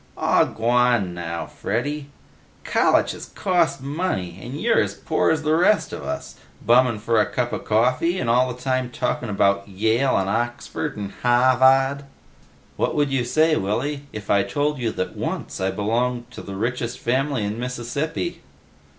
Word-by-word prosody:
"Aw, -, -, +3 dB
g'wan 120 Hz, -4 st, +1 dB
now, 85 Hz, -1 st, -4 dB
Freddy. 145 Hz, -1 st, -3 dB, 0.5 s
Collitches -, -, +1 dB
cost 175 Hz, -7 st, +1 dB
money, 135 Hz, -, -3 dB
and 130 Hz, +5 st, -6 dB
you're 230 Hz, +4 st, +3 dB
as -, -, -2 dB
poor 160 Hz, -, 0 dB
as 160 Hz, -1 st, +1 dB
the 155 Hz, 0 st, +2 dB
rest 180 Hz, +5 st, +3 dB
of -, -, -5 dB
us. -, -, -6 dB, 0.3 s
Bummin' 120 Hz, -1 st, +4 dB
for 110 Hz, +1 st, +2 dB
a -, -, +2 dB
cuppa 120 Hz, -1 st, -1 dB
coffee, 125 Hz, +11 st, +2 dB
and 125 Hz, -, -2 dB
all 125 Hz, +2 st, +3 dB
the 125 Hz, -, -9 dB
time 130 Hz, -1 st, -1 dB
talking 120 Hz, 0 st, -2 dB
about 100 Hz, -1 st, +1 dB
Yale, 110 Hz, +7 st, +1 dB
and 95 Hz, -, 0 dB
Oxford, 120 Hz, +7 st, -2 dB
and 100 Hz, -1 st, -5 dB
Hah 125 Hz, +1 st, +4 dB
vad." 135 Hz, +2 st, +4 dB, 0.7 s
"What -, -, 0 dB
would 145 Hz, -2 st, +1 dB
you 135 Hz, -2 st, +1 dB
say, 155 Hz, +6 st, +3 dB
Willy, 140 Hz, +8 st, -2 dB
if 105 Hz, -1 st, -5 dB
I 100 Hz, -, +4 dB
told 145 Hz, +8 st, -1 dB
you 120 Hz, -2 st, 0 dB
that 90 Hz, -, -4 dB
once -, -, -4 dB
I 95 Hz, -, +1 dB
belonged 120 Hz, +5 st, -1 dB
to -, -, -9 dB
the 100 Hz, -, -7 dB
richest 120 Hz, +3 st, -2 dB
family 130 Hz, 0 st, 0 dB
in 105 Hz, +3 st, -3 dB
Mississippi?" 125 Hz, -, -3 dB
125 Hz, 165 wpm, -23 LUFS, 110-140 Hz, 0.7 s, Bummin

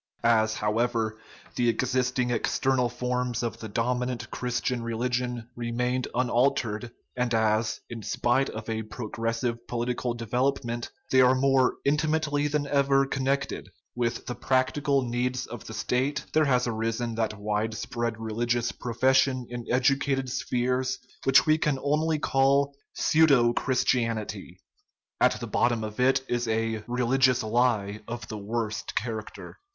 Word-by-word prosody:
As, 110 Hz, -1 st, +3 dB
however, 110 Hz, 0 st, 0 dB, 0.4 s
the 120 Hz, -1 st, +2 dB
existing 125 Hz, +1 st, 0 dB
external 125 Hz, +2 st, +1 dB
forms 125 Hz, 0 st, -2 dB
of 115 Hz, -1 st, -3 dB
the 110 Hz, -, -7 dB
dominant 125 Hz, +2 st, -2 dB
Christian 125 Hz, 0 st, -2 dB
religion 120 Hz, 0 st, -2 dB
remained 125 Hz, +2 st, -1 dB
unaltered, 120 Hz, -2 st, +1 dB, 0.2 s
and 125 Hz, -1 st, 0 dB
as, 110 Hz, 0 st, +1 dB
in 115 Hz, -1 st, -7 dB
spite 120 Hz, +5 st, +1 dB
of 110 Hz, 0 st, -7 dB
a 110 Hz, -1 st, -2 dB
progressive 115 Hz, +1 st, -3 dB
political 120 Hz, 0 st, -2 dB
development, 120 Hz, +1 st, -1 dB, 0.2 s
they 130 Hz, -, +6 dB
are 130 Hz, +1 st, +5 dB
more 130 Hz, -1 st, +3 dB
intimately 150 Hz, 0 st, +1 dB
than 150 Hz, 0 st, 0 dB
ever 140 Hz, -1 st, +3 dB
connected 135 Hz, +1 st, -2 dB, 0.2 s
with 120 Hz, -1 st, -2 dB
the 125 Hz, -, -3 dB
practical 135 Hz, +3 st, +1 dB
needs 125 Hz, +2 st, -1 dB
of 120 Hz, -, -9 dB
the 110 Hz, -, -7 dB
State, 135 Hz, +3 st, -1 dB
there 155 Hz, 0 st, +4 dB
has 125 Hz, -3 st, +2 dB
arisen 115 Hz, 0 st, -2 dB
that 110 Hz, -2 st, -1 dB
wide 105 Hz, +2 st, -1 dB
spread 115 Hz, 0 st, -3 dB
religious 120 Hz, +2 st, -1 dB
profession 130 Hz, +2 st, +1 dB
in 120 Hz, -1 st, -6 dB
educated 135 Hz, 0 st, +1 dB
spheres 130 Hz, +1 st, -1 dB, 0.3 s
which 135 Hz, 0 st, +6 dB
we 155 Hz, 0 st, +3 dB
can 150 Hz, -3 st, +1 dB
only 150 Hz, +3 st, +1 dB
call 140 Hz, 0 st, +2 dB
" -, -, -61 dB
pseudo 140 Hz, -7 st, +4 dB
Christianity 120 Hz, -4 st, -1 dB, 0.3 s
" -, -, -47 dB
at -, -, +5 dB
the -, -, -4 dB
bot 120 Hz, -, +2 dB
tom 115 Hz, -2 st, -2 dB, 0.2 s
it 130 Hz, +1 st, +3 dB
is 120 Hz, 0 st, -1 dB
a 110 Hz, -1 st, -1 dB
" -, -, -29 dB
religious 125 Hz, +1 st, +2 dB
lie 110 Hz, -3 st, +1 dB
" -, -, -33 dB
of 115 Hz, -2 st, -6 dB
the 110 Hz, -, -5 dB
worst 110 Hz, +1 st, -3 dB
character. 110 Hz, -, -5 dB
125 Hz, 145 wpm, -27 LUFS, 115-130 Hz, 0.4 s, they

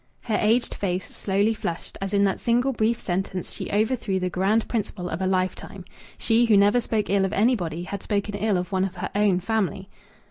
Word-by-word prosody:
Her 220 Hz, -3 st, 0 dB
aged 225 Hz, +3 st, +2 dB
face 185 Hz, -2 st, -3 dB
slowly 205 Hz, +3 st, +1 dB
flushed 170 Hz, -5 st, -5 dB
as 195 Hz, 0 st, -3 dB
in 200 Hz, -1 st, +3 dB
that 195 Hz, -1 st, +1 dB
single 245 Hz, +3 st, +2 dB
brief 230 Hz, 0 st, +1 dB
sentence 185 Hz, 0 st, -3 dB
she -, -, -6 dB
overthrew 215 Hz, -2 st, 0 dB
the 180 Hz, 0 st, -2 dB
grand 200 Hz, +5 st, +1 dB
principle 205 Hz, -5 st, -3 dB
of 165 Hz, +1 st, -4 dB
a 190 Hz, -, +1 dB
lifetime. 185 Hz, 0 st, -2 dB, 0.3 s
She 230 Hz, +1 st, +3 dB
who 220 Hz, -3 st, +5 dB
never 205 Hz, +5 st, +4 dB
spoke 220 Hz, -2 st, -1 dB
ill 200 Hz, -1 st, +3 dB
of 190 Hz, +1 st, -1 dB
anybody 185 Hz, -8 st, +1 dB
had 200 Hz, +2 st, -5 dB
spoken 205 Hz, -1 st, -2 dB
ill 205 Hz, -1 st, +1 dB
of 180 Hz, +2 st, -4 dB
one 190 Hz, -1 st, +1 dB
of 190 Hz, -1 st, -3 dB
her 180 Hz, -, -4 dB
own 200 Hz, -3 st, +2 dB
family. 195 Hz, -2 st, -1 dB
200 Hz, 205 wpm, -24 LUFS, 185-220 Hz, 0.3 s, who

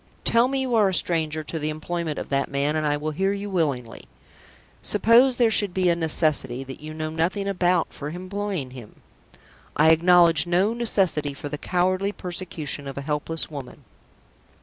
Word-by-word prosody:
"Tell 235 Hz, +2 st, +4 dB
me 270 Hz, 0 st, -1 dB
you 260 Hz, -2 st, -2 dB
are 215 Hz, -4 st, +4 dB
a 190 Hz, -, -1 dB
stranger 155 Hz, -3 st, 0 dB
to 160 Hz, +1 st, -5 dB
the 150 Hz, 0 st, -2 dB
employment 155 Hz, 0 st, -4 dB
of -, -, -6 dB
that 140 Hz, 0 st, 0 dB
man, 140 Hz, +2 st, 0 dB
and 155 Hz, -1 st, 0 dB
I 145 Hz, 0 st, +1 dB
will 155 Hz, +1 st, -3 dB
hear 195 Hz, +6 st, 0 dB
you 200 Hz, 0 st, -5 dB
willingly." 140 Hz, -10 st, -2 dB, 0.8 s
"Suppose 235 Hz, +5 st, +4 dB
there 235 Hz, -3 st, +3 dB
should 205 Hz, -4 st, +3 dB
be 185 Hz, -1 st, +2 dB
a 170 Hz, -, +3 dB
necessity, 155 Hz, -6 st, 0 dB
that 135 Hz, +1 st, -10 dB
you 155 Hz, +1 st, -8 dB
know 155 Hz, 0 st, -4 dB
nothing 180 Hz, +5 st, -1 dB
about, 180 Hz, -3 st, +1 dB
for 145 Hz, -, -6 dB
employing 185 Hz, -4 st, -4 dB
him?" 120 Hz, -5 st, -13 dB, 0.7 s
"I 160 Hz, +2 st, +5 dB
acknowledge 170 Hz, 0 st, +5 dB
no 185 Hz, +5 st, +2 dB
necessity 185 Hz, -11 st, 0 dB
for 145 Hz, -, -7 dB
the 150 Hz, 0 st, -5 dB
cowardly 185 Hz, +2 st, 0 dB
persecution 175 Hz, -7 st, -5 dB
of 135 Hz, -, -7 dB
a -, -, -3 dB
helpless 150 Hz, +3 st, -2 dB
woman." 140 Hz, -1 st, -9 dB
165 Hz, 180 wpm, -24 LUFS, 150-195 Hz, 0.8 s, I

